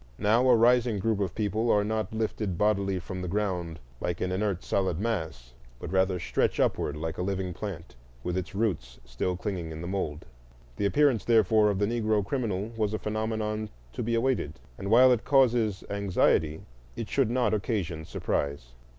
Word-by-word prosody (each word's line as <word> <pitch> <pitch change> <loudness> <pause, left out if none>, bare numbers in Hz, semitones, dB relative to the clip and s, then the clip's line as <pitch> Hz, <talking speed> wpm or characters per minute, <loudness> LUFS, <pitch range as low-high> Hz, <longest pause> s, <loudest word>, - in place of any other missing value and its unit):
Now 115 +5 +3
a 125 - +7
rising 120 -1 +4
group 110 +1 0
of 95 -4 -2
people 110 +2 0
are 105 -2 +4
not 110 +1 -2
lifted 110 -4 -2
bodily 100 -2 +1
from 90 0 -6
the 90 - -4
ground 90 -4 -2 0.2
like 85 -1 -2
an 90 - -1
inert 95 -1 -1
solid 95 -4 0
mass, 80 - -3 0.3
but - - -6
rather 95 -1 +2
stretch - - 0
upward 75 - 0
like 80 +1 -4
a - - 0
living 95 -1 -2
plant 90 - -7 0.3
with 90 0 -2
its 95 +1 -4
roots 75 - -2
still 60 +10 -2
clinging 90 -4 -4
in 80 - -7
the - - -5
mould. 85 -6 -3 0.5
The 100 - +1
appearance, 135 -4 +3
therefore, 110 -2 +4
of 100 - 0
the 100 - +2
Negro 110 -2 +1
criminal 105 -3 -2
was 110 -1 0
a - - 0
phenomenon 110 0 -2 0.2
to - - -4
be 115 +1 0
awaited; 115 - 0 0.2
and 100 +9 -5
while 125 +4 +7
it 120 -3 +2
causes 120 -7 +3
anxiety, 90 -6 +1 0.3
it 110 - -4
should 135 -5 +1
not 120 -3 +1
occasion 95 -7 -2
surprise. 70 -4 -2
100 Hz, 180 wpm, -28 LUFS, 90-110 Hz, 0.5 s, a